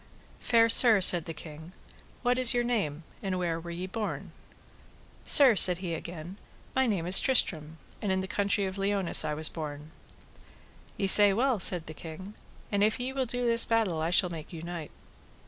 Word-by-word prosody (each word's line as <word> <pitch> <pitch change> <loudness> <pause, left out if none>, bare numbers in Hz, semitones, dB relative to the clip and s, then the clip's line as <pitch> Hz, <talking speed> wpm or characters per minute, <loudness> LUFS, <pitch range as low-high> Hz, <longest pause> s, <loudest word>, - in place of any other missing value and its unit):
Fair 230 -1 +2
sir, 230 -2 +5
said 175 -3 +4
the 165 - -7
king, 160 +2 -12 0.5
what 250 0 0
is 250 -1 +6
your 240 - 0
name, 195 -11 -3 0.2
and 190 -2 -4
where 170 -2 -3
were 170 +1 -11
ye 170 +2 -6
born? 210 +3 -6 0.9
Sir, 270 -6 +6
said 180 -2 +5
he 180 -2 -6
again, 170 +3 -9 0.4
my 265 0 +1
name 195 -7 -3
is 180 +2 +6
Tristram, 160 - 0 0.2
and 205 - -3
in 190 - -1
the 190 - -5
country 200 0 -1
of 190 +1 -7
Liones 195 -2 +2
was 155 +1 -2
I - - -22
born. 150 -1 -8 1.1
Ye 195 - -2
say 200 +1 +7
well, 245 +1 -1
said 175 -2 -2
the 155 - -10
king; 165 +6 -11 0.4
and 205 -1 0
if 215 +4 0
ye 255 +2 -4
will 265 -2 -3
do 245 +1 -4
this 230 0 +1
battle 215 -8 -1
I 160 - -2
shall 180 0 +1
make 160 -3 -10
you 165 -2 -10
knight. 170 -3 -8
190 Hz, 190 wpm, -27 LUFS, 165-225 Hz, 1.1 s, say